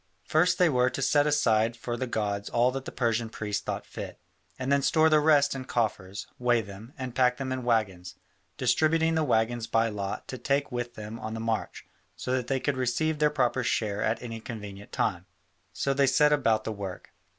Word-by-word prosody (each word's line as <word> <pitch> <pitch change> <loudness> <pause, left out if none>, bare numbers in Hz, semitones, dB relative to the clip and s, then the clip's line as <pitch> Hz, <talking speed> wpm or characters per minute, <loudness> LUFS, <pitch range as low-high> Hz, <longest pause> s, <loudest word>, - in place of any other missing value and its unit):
First 180 +3 +3
they 180 -1 +5
were 125 -4 +3
to - - -5
set 145 +2 +3
aside 115 -6 +2
for 120 +1 -4
the 130 +2 -3
gods 100 -3 -2
all 120 +2 +3
that 135 0 -5
the - - -6
Persian 115 -2 0
priests 105 -2 -3
thought - - -4
fit, - - -8 0.4
and 130 +1 -2
then 140 0 +4
store 160 +3 +4
the 155 -1 +5
rest 145 -2 +4
in 130 -1 -6
coffers, 105 -6 -2
weight 120 -3 +2
them, 100 +5 -11
and 130 -2 -5
pack 125 -1 +3
them 135 -1 -4
on 130 -1 -3
waggons, 95 -7 0 0.4
distributing 160 +6 +2
the 160 -1 +2
waggons 115 -3 +1
by 115 0 +2
lot 100 -2 -4
to 130 - -5
take 140 +3 0
with 120 -1 -4
them 110 +2 -7
on 110 +1 -5
the - - -4
march, 115 -1 -3 0.3
so 125 - -4
that 130 -2 0
they 135 -1 0
could 140 0 -1
receive 150 +5 0
their 150 -1 +4
proper 130 -3 0
share 105 -2 -1
at 110 +1 0
any 115 -2 -6
convenient 105 -3 -8
time. - - -1 0.4
So 140 - -1
they 140 0 +3
set 150 +2 +4
about 115 -7 +2
the 110 - -3
work. 100 -3 -7
120 Hz, 205 wpm, -28 LUFS, 110-140 Hz, 0.4 s, they